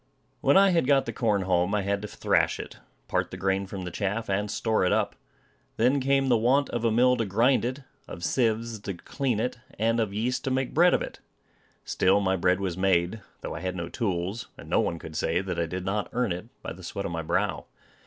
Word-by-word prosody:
When - - +4
I 195 0 +6
had 165 -7 +2
got 135 -2 +4
the - - -4
corn 105 -5 +1
home, 90 +2 +1
I 105 - 0
had 100 +1 -1
to 105 - -5
thrash - - +1
it, - - -8 0.3
part - - 0
the 90 - -7
grain 95 +1 0
from 95 -1 -6
the 90 - -5
chaff, 105 +3 -2
and 105 +2 0
store 110 +1 +1
it 90 - +2
up. - - +1 0.6
Then 125 +5 +3
came 135 0 +2
the 120 -3 +4
want 130 +5 +2
of 120 - -2
a 115 - +3
mill 125 +3 +4
to 115 - 0
grind 115 +7 +3
it, 130 +3 -3 0.3
of 85 - -8
sieves 115 - 0
to 100 -2 -5
clean 125 +4 -2
it, 125 +2 -2 0.2
and 115 +2 +1
of 110 -3 0
yeast 115 +5 -1
to - - 0
make 130 0 -1
bread 175 +3 +5
of - - 0
it. - - -8 0.7
Still, 95 +2 +3
my 95 -1 +1
bread 90 +1 +2
was 95 -3 -2
made, 95 +2 +1 0.2
though - - -5
I - - -5
had 90 +1 -3
no 85 -1 -4
tools; 95 +1 -2
and - - -11
no - - +2
one 85 - 0
could 80 -1 -9
say 80 +2 +1
that 90 -2 -3
I 85 - 0
did 90 +2 -5
not 105 +2 -1
earn 125 -4 0
it, 90 +5 -4 0.2
by - - -5
the 90 - -13
sweat 100 +3 -5
of - - -3
my 80 -1 -2
brow. 90 +5 -1
105 Hz, 240 wpm, -27 LUFS, 95-120 Hz, 0.7 s, I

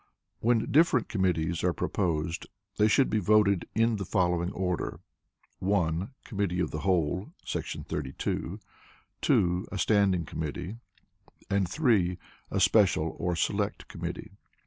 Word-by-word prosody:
When 115 -1 +1
different 150 -5 +4
committees 85 -4 0
are - - +2
proposed 85 -3 -1 0.3
they 105 - +5
should 125 +2 +3
he 110 - +3
voted 100 -1 +3
in 115 0 +3
the 100 - -3
following 90 -2 +1
order: 90 -2 -2 0.6
(1) 90 -2 0
Committee 100 -5 -2
the 75 - -3
whole 90 +1 0
[§ - - -4
32], 70 -3 -3 0.6
(2) 90 +1 +2
a 100 - -4
standing 95 -3 +2
committee, 85 +7 -5 0.7
and 100 -2 +2
(3) 105 - +2 0.3
a - - -1
special - - +3
(or 90 -1 0
select) 80 - -1
committee. - - -6
95 Hz, 125 wpm, -29 LUFS, 85-105 Hz, 0.7 s, they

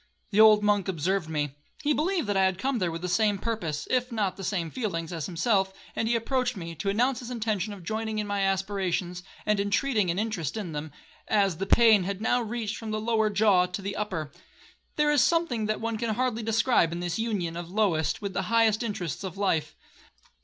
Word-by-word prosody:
The 205 - +1
old 215 -1 +7
monk 205 -2 +2
observed 180 0 -1
me. 145 -3 -2 0.3
He 300 0 +3
believed 340 +1 0
that 205 -1 -1
I 190 0 +4
had 190 -1 +1
come 260 +4 -1
there 180 -3 0
with 165 +1 -6
the - - -1
same 210 +2 +2
purpose, 185 -9 -3
if 250 0 +1
not 210 -5 0
with - - -26
the 195 - -7
same 170 -4 -2
feelings, 175 -9 -3
as 160 -3 -3
himself; 190 +2 +1 0.2
and 225 - 0
he 235 - +2
approached 250 0 0
me, 165 -2 -6
to 195 +4 -3
announce 245 +6 +1
his 245 - -8
intention 215 -4 -2
of 200 -3 -9
joining 220 +3 -3
in 210 - -1
my 205 -1 -1
aspirations, 190 -2 -1 0.2
and 210 -1 +2
intreating 205 0 +1
an 170 - 0
interest 210 -5 -2
in 195 -6 -4
them, 150 0 -5 0.4
as 195 -5 +2
the 195 - -3
pain 225 -3 +6
had 195 0 -3
now 245 +3 +1
reached 225 -1 -3
from 225 - -6
the 215 0 -1
lower 220 -1 +1
jaw 200 -3 +4
to 180 +2 -5
the 200 0 -3
upper. 175 -8 -3 0.6
There 300 0 +3
is 295 -3 +4
something 275 -11 +1
that 215 - -1
one 230 -1 -3
can 225 -2 -1
hardly 245 -1 0
describe 225 -5 +2
in 170 - -4
this 175 +3 -2
union 200 -8 -2
of 170 0 -5
the 180 - -12
lowest 190 -4 +1
with 200 -1 -3
the - - 0
highest 225 -1 +3
interests 205 - -3
of 190 -1 -6
life. 160 -7 0
205 Hz, 225 wpm, -27 LUFS, 180-225 Hz, 0.6 s, old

